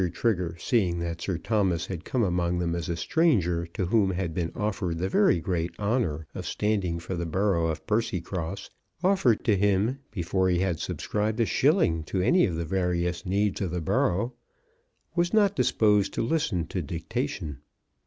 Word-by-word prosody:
Trigger, 90 -8 0
seeing 95 -6 +1
that 85 -1 -4
Sir 95 -4 -2
Thomas 95 -3 0
had 90 -3 -6
come 125 -3 0
among 90 -2 0
them 85 -1 -1
as 85 -1 -3
a 85 - 0
stranger 90 - +1
to 85 +2 -3
whom 100 +1 +3
had 90 -3 -2
been 85 0 -2
offered 95 -5 -2
the 90 +3 -1
very 95 -3 +4
great 85 0 -2
honour 100 - 0
of - - -6
standing 100 -5 0
for 85 +3 -6
the 85 -1 -2
borough 90 -1 +1
of 80 -1 -4
Percycross, 95 -4 -2 0.3
offered 185 - +3
to 110 - +4
him 100 +6 +1
before 95 -1 0
he 90 - +2
had 90 -3 0
subscribed 105 +2 -2
a 115 - +4
shilling 130 - +2
to 95 - -2
any 175 - +4
of 85 - -3
the 85 +1 -2
various 90 -1 -1
needs 100 +2 0
of 95 - -1
the 90 +1 -2
borough, 95 +8 0 0.8
was 175 +3 +1
not 205 -2 +4
disposed 105 -5 +2
to - - 0
listen 115 - 0
to 90 +3 -3
dictation. 80 -3 -4
95 Hz, 175 wpm, -27 LUFS, 85-105 Hz, 0.8 s, very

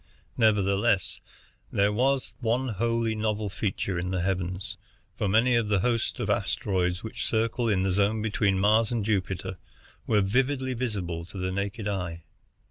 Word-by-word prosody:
Nevertheless, 100 -2 +2 0.5
there 100 +1 +2
was 130 +4 +1
one 125 +2 0
wholly 115 +1 0
novel 110 -1 -1
feature 95 -2 -2
in 90 +1 -2
the 95 -1 -1
heavens, 90 +1 -2 0.4
for 105 - -1
many 115 +6 +4
of 115 -3 +1
the 100 -3 +2
host 115 +1 0
of - - -1
asteroids 90 -2 0
which 110 - -4
circle 115 +1 +1
in 95 -3 +2
the 95 - +1
zone 100 +3 +2
between 100 -2 +1
Mars 110 +3 +3
and 115 -4 -1
Jupiter 95 -3 -1 0.5
were 105 -2 +4
vividly 130 +6 +1
visible 100 -9 -3
to 95 - -10
the 95 0 -2
naked 100 +3 -3
eye. 90 -4 -3
105 Hz, 155 wpm, -27 LUFS, 95-115 Hz, 0.5 s, many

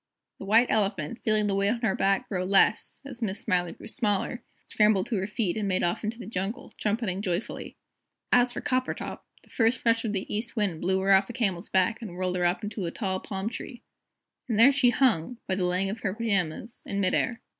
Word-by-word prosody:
The - - -7
White 225 +5 +4
Elephant, 200 -1 0
feeling 215 -2 +2
the 205 - 0
weight 200 +1 +2
on 230 +1 -1
her 220 -5 +1
back 195 0 +1
grow 185 -3 -2
less 200 +7 +2
as 255 -3 -9
Miss 205 -3 -2
Smiler 180 -1 0
grew - - -12
smaller 220 0 -1 0.2
scrambled 210 -3 +3
to 225 - -2
her 190 +1 -2
feet, 210 -4 -1
and 215 -2 -2
made 185 -1 0
off 175 +5 0
into 220 +2 -3
the 235 - -8
jungle, 195 +1 -4
trumpeting 210 -3 -1
joyfully. 185 +1 -3 0.6
As 245 0 +5
for - - -5
Coppertop, 255 0 -2 0.2
the - - -22
first 230 +1 +1
rush 230 0 +3
of 225 - -1
the 195 -2 -2
East 225 +4 -3
Wind 200 -8 -1
blew 190 +1 +1
her 195 +1 +2
off 195 0 +4
the 240 - -6
Camel's 195 -7 -1
back 220 +5 +2
and 200 -6 -7
whirled 185 0 -2
her 180 -1 +1
up 175 +5 +1
into 205 -3 -4
a - - -1
tall 190 -3 -2
palm 195 +1 -5
tree. 240 +2 -7 0.7
And 220 - 0
there 260 +5 +8
she 275 -3 +4
hung 240 -4 +1
by 190 - 0
the 185 -1 0
leg 180 +2 +1
of 215 +3 -4
her 195 -2 -2
pyjamas 205 -1 -2
in 200 - -2
mid 185 -2 +2
air. 245 -2 0
205 Hz, 225 wpm, -27 LUFS, 190-230 Hz, 0.7 s, there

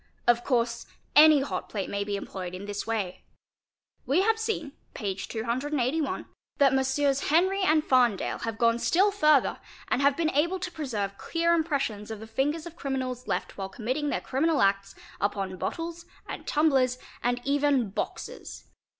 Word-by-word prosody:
Of 240 0 +3
course 235 -2 0 0.3
any 305 -1 +8
hot 275 - -4
plate 200 -3 -3
may 200 0 -2
be 200 0 -3
employed 185 -2 -6
in 190 +2 -7
this 205 +1 -4
way. 210 -5 -2 0.8
We 315 +8 +3
have 445 +1 +2
seen 440 -10 -2 0.2
(p. 200 -2 -2
281) 255 +8 -2 0.3
that 275 -3 +5
Messrs. 265 +1 +1
Henry 375 +6 +3
and 315 -4 +3
Farndale 245 -8 +2
have 225 -1 -3
gone 230 0 +3
still 385 +10 +3
further 305 -8 +3 0.3
and - - +1
have 280 0 +3
been 325 -2 +1
able 340 +7 +1
to 365 0 -4
preserve 210 - -4
clear 335 0 +1
impressions 275 -11 -1
of 220 -1 -6
the 220 - -8
fingers 285 +8 -1
of 340 -1 -9
criminals 260 -4 -3
left - - -3
while 195 0 -3
committing 255 +9 -2
their - - -1
criminal 300 +2 +1
acts 195 0 +1 0.2
upon 195 -2 -1
bottles 335 - -4 0.2
and - - -7
tumb 305 +1 +3
lers 255 -2 +2 0.2
and 245 0 0
even 280 -6 +2
boxes. - - -6
265 Hz, 165 wpm, -27 LUFS, 220-310 Hz, 0.8 s, any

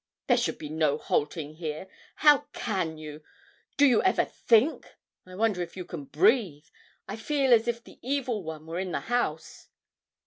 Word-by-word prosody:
'There - - +3
should - - -1
be 150 - -7
no 155 -1 +1
halting 150 0 -2
here. 160 +2 -5 0.3
How 295 -2 +5
can 180 -7 -2
you 155 0 -9 0.6
do 285 - +6
you 245 -5 +5
ever 375 - +2
think? 240 +7 +1 0.3
I 185 - -11
wonder 205 -3 +1
if 175 - -6
you 180 - -5
can 145 -4 -7
breathe. 180 - +2 0.4
I - - -5
feel 270 +3 +2
as 230 0 +4
if 235 0 -2
the - - -16
evil 255 -4 -1
one 160 -2 -8
were 165 +2 -4
in 185 -1 -3
the - - -1
house.' 230 -10 -3
185 Hz, 175 wpm, -27 LUFS, 155-240 Hz, 0.6 s, do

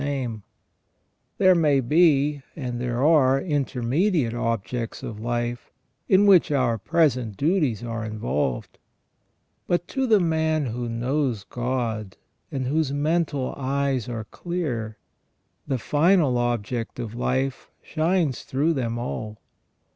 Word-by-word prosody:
There 185 -1 +6
may 150 -5 +3
be, 145 +1 +3
and 125 -5 -4
there 125 +1 -1
are, 135 -4 +5
intermediate 140 - 0
objects 115 -1 -3
of 105 -2 -6
life, 120 +1 -3 0.4
in 195 +2 +5
which 190 -6 +6
our 125 -5 +1
present 125 - +1
duties 145 - +1
are 115 -1 -4
involved; 105 - -3 0.9
but 175 0 0
to 265 -1 -1
the 215 -3 +5
man 160 -3 +1
who 120 0 -3
knows 125 -1 -1
God, 120 -5 -3 0.3
and 130 -2 -2
whose 150 +1 0
mental 145 -2 0
eyes 135 -3 -1
are 115 -2 -4
clear, 120 -7 -4 0.7
the 135 -2 0
final 150 - +3
object 120 -1 -2
of 115 -3 -5
life 130 +2 -2
shines 160 -4 0
through 150 +5 0
them 120 -5 -2
all. 110 -3 -5
130 Hz, 115 wpm, -24 LUFS, 120-155 Hz, 0.9 s, There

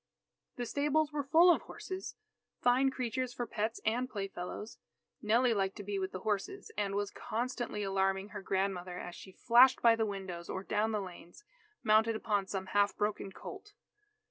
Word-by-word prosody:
The 245 - -3
stables 295 +4 +1
were 290 -1 -1
full 345 +3 +8
of - - -2
horses, 375 0 -7 0.4
fine 250 +2 +4
creatures 255 -1 -3
for 240 - -2
pets 220 0 -2
and 245 +4 +1
playfellows. 195 0 -6 0.4
Nellie 235 +3 +3
liked 195 -2 0
to 205 - -7
be 200 0 -2
with 190 0 -2
the 185 - -6
horses, 215 - -2
and 200 -1 -1
was 205 0 -1
constantly 235 -2 -3
alarming 195 0 0
her - - -7
grandmother 190 -2 -1
as 175 - -6
she 190 - -11
flashed 245 +6 +6
by 230 -1 +7
the 225 -1 0
windows 190 -4 -6
or 190 - -3
down 215 +2 0
the 210 -1 0
lanes, 180 - -11 0.4
mounted 220 0 +4
upon 205 -3 0
some 190 -1 -3
half 205 0 +3
broken 210 -2 -1
colt. 405 - -10
215 Hz, 170 wpm, -33 LUFS, 195-245 Hz, 0.4 s, full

